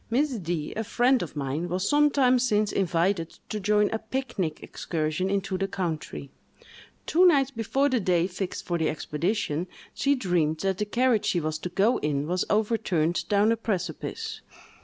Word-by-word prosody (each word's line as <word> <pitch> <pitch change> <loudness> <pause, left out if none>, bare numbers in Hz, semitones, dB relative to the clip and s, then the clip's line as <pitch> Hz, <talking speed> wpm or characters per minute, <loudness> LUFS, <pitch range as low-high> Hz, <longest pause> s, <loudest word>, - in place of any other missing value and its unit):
Miss 275 +6 +1
D——, 170 -5 -3
a 220 - -2
friend 245 +4 +2
of 160 -3 -6
mine, 145 +5 -2
was 185 +3 -1
some 295 0 +4
time 255 -3 +3
since 215 -4 +1
invited 175 -1 0
to 215 - -3
join 210 +1 +2
a 225 - -1
pic 260 +1 -5
nic 155 -4 -2
excursion 160 +3 -2
into 195 -1 -1
the 195 - 0
country. 170 -7 -4 0.7
Two 350 +3 +3
nights 275 -5 +4
before 270 +4 0
the 260 -3 +1
day 180 -4 +2
fixed 185 0 -5
for 175 -1 -1
the 160 - +1
expedition, 160 +2 -2 0.3
she 280 0 +2
dreamed 175 - 0
that 195 0 -1
the 210 - 0
carriage 235 +1 +2
she 175 - +1
was 155 -1 -3
to 180 - -4
go 210 +7 +2
in 145 -1 -1
was 180 +3 0
overturned 205 -7 0
down 205 +2 +4
a - - +3
precipice. 185 -8 -4
195 Hz, 180 wpm, -26 LUFS, 170-225 Hz, 0.7 s, some